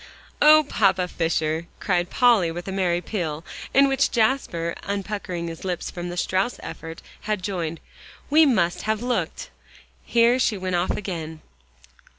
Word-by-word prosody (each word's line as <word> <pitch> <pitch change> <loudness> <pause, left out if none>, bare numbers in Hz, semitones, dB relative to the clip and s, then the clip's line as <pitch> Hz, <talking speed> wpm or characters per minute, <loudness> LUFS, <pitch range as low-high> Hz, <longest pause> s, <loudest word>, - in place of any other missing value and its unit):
"Oh, 310 +1 +8
Papa 190 -6 +2
Fisher!" 165 -1 -1
cried 180 -3 0
Polly 235 -9 +4
with 175 +3 -6
a - - -3
merry 180 -2 0
peal 165 -6 -4 0.3
in 275 +1 +5
which 270 -1 +2
Jasper, 220 -9 0
unpuckering 200 -3 -4
his 165 -1 -7
lips 180 -2 -3
from 175 0 -5
the 175 - -6
Strauss 190 +6 0
effort, 165 0 -8 0.3
had 210 -4 -1
joined, 170 -4 -3 0.5
"we 310 +3 +6
must 180 - +2
have 220 +1 0
looked" 245 0 -2 0.5
Here 235 +2 +3
she 220 -4 +1
went 185 -1 -2
off 175 +1 0
again. 160 -5 -4
185 Hz, 150 wpm, -24 LUFS, 170-220 Hz, 0.5 s, Oh